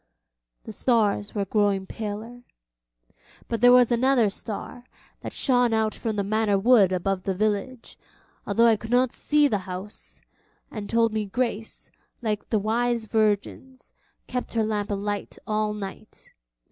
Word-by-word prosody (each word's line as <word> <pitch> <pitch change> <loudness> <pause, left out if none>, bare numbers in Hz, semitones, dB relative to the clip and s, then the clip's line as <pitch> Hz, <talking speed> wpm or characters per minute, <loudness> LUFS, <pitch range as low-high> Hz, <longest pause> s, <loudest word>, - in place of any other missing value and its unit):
The - - -8
stars 215 -3 +1
were 200 -1 0
growing 200 -1 +1
paler; 220 +4 -6 1.1
but 230 -2 -3
there 245 0 +7
was 250 -1 +6
another 240 -3 +3
star, 220 +4 -7 0.4
that - - -7
shone 245 -3 +2
out 220 -1 +1
from 225 -3 -3
the 200 - 0
Manor 210 0 +1
woods 205 -2 +5
above 185 +1 -1
the 190 0 -2
village, 215 +4 -2 0.5
although 225 +3 +3
I 225 -2 +5
could 225 +2 -9
not 250 +1 +3
see 295 -1 +2
the 210 -7 0
house, 185 +3 -7 0.5
and 210 -2 -6
told 230 -1 +2
me 215 -1 -2
Grace, 225 0 -3 0.3
like 215 -3 -3
the 220 - +2
wise 230 +2 0
virgins, 220 +4 -2 0.3
kept 250 -1 -5
her 225 - +2
lamp 210 -1 -2
alight 205 0 -3
all 215 0 0
night. 205 +1 -9
215 Hz, 145 wpm, -25 LUFS, 205-240 Hz, 1.1 s, there